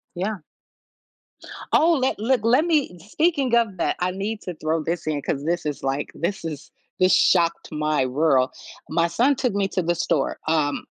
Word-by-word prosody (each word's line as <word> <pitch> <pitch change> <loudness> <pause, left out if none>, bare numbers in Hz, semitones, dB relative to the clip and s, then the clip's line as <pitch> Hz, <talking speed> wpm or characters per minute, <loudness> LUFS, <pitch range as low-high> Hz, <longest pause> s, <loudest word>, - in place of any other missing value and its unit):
Yeah. 195 +1 -3 1.3
Oh, 335 +2 +5
let 260 - 0
let 235 +1 +1
let 250 +8 +3
me 295 - 0
speaking 270 - 0
of 225 -5 +2
that, 170 - -1
I 180 +1 +1
need 205 +3 -4
to 180 - -6
throw 155 +1 -1
this 170 +1 -3
in 150 -2 -1
'cause 140 +1 -3
this 170 0 -1
is, 145 - -3
like, 135 +1 -2
this 170 0 -3
is 150 -3 -6 0.3
this 185 0 +4
shocked 170 -2 +2
my 150 -3 0
world. 130 -1 +2 0.4
My 170 0 +2
son 245 +11 +2
took 250 -5 -1
me 195 -1 0
to 185 - -1
the 175 +1 0
store, 170 - -1
um, 150 -3 0
175 Hz, 180 wpm, -23 LUFS, 155-225 Hz, 1.3 s, Oh